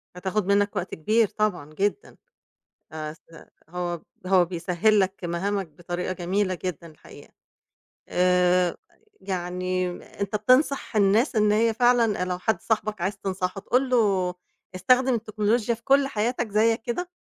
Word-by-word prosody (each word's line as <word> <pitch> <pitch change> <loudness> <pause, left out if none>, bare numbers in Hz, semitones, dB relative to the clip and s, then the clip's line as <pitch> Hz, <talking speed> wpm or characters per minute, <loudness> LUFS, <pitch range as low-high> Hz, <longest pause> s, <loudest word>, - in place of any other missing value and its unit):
هتاخد 190 +2 -2
منّك 205 +1 +2
وقت 185 -2 -3
كبير 215 +8 +2
طبعًا 185 -8 -2
جدًا. 205 - -2 0.8
آآ 155 -1 -5
س 160 - -18 0.5
هو 175 0 -4 0.3
هو 185 -1 +4
بيسهِّل 180 +5 +1
لك 190 -1 -2
مهامك 195 +3 -2
بطريقة 175 +4 -5
جميلة 185 +2 -1
جدًا 170 -2 -4
الحقيقة. 155 -2 -15 0.8
آآ 180 -1 +2 0.4
يعني 185 0 -2 0.3
أنت 200 +1 -1
بتنصح 255 +2 +2
الناس 215 +6 +3
إن 210 -1 +4
هي 225 +1 +2
فعلًا 240 -4 +3
آآ - - +2
لو 180 -1 -3
حد 185 -1 -1
صاحبك 215 -2 -1
عايز 195 +3 -2
تنصحه 190 0 -3
تقول 255 +5 0
له 195 -7 +2 0.4
استخدم 250 +8 +3
التكنولوجيا 220 +1 0
في 225 - -16
كل 275 0 +4
حياتك 235 0 -1
زيّك 225 +2 +2
كده؟ 350 +11 -3
200 Hz, 140 wpm, -25 LUFS, 180-220 Hz, 0.8 s, هو